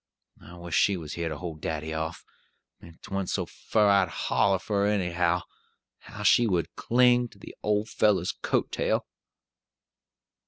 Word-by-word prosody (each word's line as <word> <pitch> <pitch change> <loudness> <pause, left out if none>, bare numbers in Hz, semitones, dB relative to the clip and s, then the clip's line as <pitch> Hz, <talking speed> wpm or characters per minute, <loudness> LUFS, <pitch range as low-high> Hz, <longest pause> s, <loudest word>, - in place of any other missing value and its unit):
I 85 - -12
wish 85 -1 -8
she 100 +2 +3
was 80 -3 -7
here 85 -1 -3
to 75 - -5
hold 80 -1 -7
daddy 80 0 -3
off. 80 +2 -4 0.5
If 85 -1 -15
'twa'n't 95 -1 -3
so - - -1
fur 105 -2 0
I'd 100 -3 +4
holler 95 +3 +1
for 100 +1 -1
her, 105 - +2
anyhow. 90 -2 0 0.6
How 105 - -9
she 120 +3 +5
would 85 -6 -1
cling 125 0 +3
to 110 - -20
the - - -12
old 105 +1 0
fellow's 100 -5 +2
coat - - -1
tail!" - - 0
95 Hz, 160 wpm, -27 LUFS, 85-105 Hz, 0.6 s, she